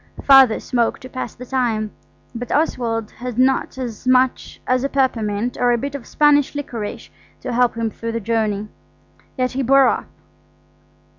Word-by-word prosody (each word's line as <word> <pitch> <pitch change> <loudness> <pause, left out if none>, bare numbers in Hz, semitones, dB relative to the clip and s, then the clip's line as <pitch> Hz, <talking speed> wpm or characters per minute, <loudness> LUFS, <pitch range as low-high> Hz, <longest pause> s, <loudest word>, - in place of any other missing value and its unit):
Father 270 -5 +6
smoked 240 -1 -1
to 255 - -9
pass 255 - -6
the 250 - -9
time, 230 -5 -1 0.4
but 245 +1 -6
Oswald 230 -7 -1
had 245 -1 -7
not 260 +1 +2
so 260 -1 -3 0.2
much 255 0 +1
as 255 0 +1
a 275 - 0
peppermint 235 -4 -1
or 245 0 +3
a 240 - +2
bit 280 +4 -4
of 280 -4 -7
Spanish 290 -1 +3
liquorice 235 -7 -6 0.3
to - - -4
help 245 -1 +2
him 225 -1 -1
through 230 +1 -5
the 230 - -1
journey. 215 -1 -1 0.7
Yet 255 -1 0
he 265 - -2
bore 270 +1 +5
up. - - -1
250 Hz, 165 wpm, -20 LUFS, 230-265 Hz, 0.7 s, Father